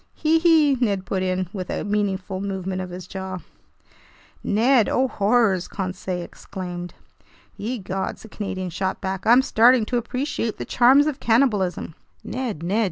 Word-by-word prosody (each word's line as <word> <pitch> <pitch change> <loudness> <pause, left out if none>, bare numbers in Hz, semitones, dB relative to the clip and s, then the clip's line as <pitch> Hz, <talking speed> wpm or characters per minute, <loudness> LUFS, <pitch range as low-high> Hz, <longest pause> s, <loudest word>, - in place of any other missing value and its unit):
"Hee 320 +1 +2
hee!" 320 -4 +5
Ned 200 -5 0
put 190 +1 -2
in, 185 0 -1
with 185 -3 -5
a - - -2
meaningful 195 -2 -2
movement 190 -1 -3
of 185 - -6
his 180 0 -8
jaws. 190 -1 -6 1.0
"Ned! 230 +2 +3
Oh 260 +1 +2
horrors!" 205 -4 +2
Conseil 185 -2 -4
exclaimed. 175 -1 -7 0.6
"Ye 240 +5 -3
gods," 190 -1 -4
the - - -10
Canadian 190 -3 -4
shot 190 +2 -2
back, 190 +1 -4
"I'm 245 +3 +6
starting 240 -1 +5
to 245 - -1
appreciate 240 -1 -2
the - - -5
charms 260 +4 +5
of 300 -2 -2
cannibalism!" 215 -9 +1 0.3
"Ned, 235 - -4
Ned! 195 +6 0
200 Hz, 155 wpm, -23 LUFS, 185-245 Hz, 1.0 s, I'm